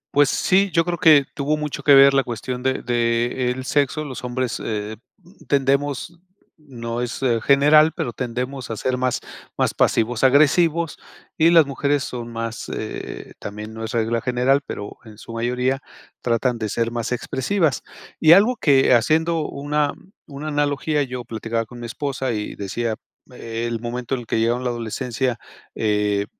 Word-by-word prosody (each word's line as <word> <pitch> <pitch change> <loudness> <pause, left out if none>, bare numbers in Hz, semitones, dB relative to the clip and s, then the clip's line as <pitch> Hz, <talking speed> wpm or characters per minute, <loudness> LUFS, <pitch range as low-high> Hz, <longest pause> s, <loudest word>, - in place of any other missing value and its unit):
Pues 145 -1 +5
sí, 195 +2 +2
yo 165 -1 +2
creo 175 -1 -2
que 150 -3 +6
tuvo 150 +1 -1
mucho 150 -1 -4
que 145 - +6
ver 135 0 +8
la 135 0 +3
cuestión 125 +1 -5
de 130 +1 -1
de 120 +1 0
el 130 +1 -4
sexo. 145 +2 0
Los 130 -3 -7
hombres, 125 -2 -2
eh, 105 0 -3 0.2
mm, 185 +4 -21
tendemos 140 +3 0 0.4
no 120 -6 -6
es 125 -1 -4 0.2
general, 150 +3 +5
pero 120 - -2
tendemos 125 +2 -4
a 115 - -4
ser 130 +4 -1
más 130 -1 -1 0.4
más - - +1
pasivos 115 +2 +1
agresivos, 155 +4 +3 0.4
y 160 +1 +4
las 165 -3 +6
mujeres 140 +1 0
son 120 -2 -6
más 115 0 -5
eh, - - -6
también 105 +2 -7
no 110 0 -7
es 110 - -4
regla 115 0 0
general, 125 +2 +2
pero 100 - -7
en 110 -2 -14
su 115 - -10
mayoría 125 +3 -1 0.4
tratan 120 0 0
de 110 - -2
ser 115 +2 -1
más 120 0 -3
expresivas. 135 - 0 0.4
Y 160 +1 +7
algo 215 +7 +5
que 135 -3 +4
haciendo 160 +6 +2
una 145 +1 -1 0.3
una 150 +1 -6
analogía, 145 +1 0
yo 125 -3 -4
platicaba 115 0 -3
con 120 +2 -12
mi 120 - -6
esposa, 135 -1 -3
y 105 -1 -4
decía 110 +3 -3 0.3
el 115 -1 -4
momento 120 +2 -3
en - - -5
el 115 - -13
que - - 0
llegaron 120 +3 0
la - - +1
adolescencia, 120 +1 -3 0.4
eh, 105 -2 0
125 Hz, 170 wpm, -22 LUFS, 115-145 Hz, 0.4 s, ver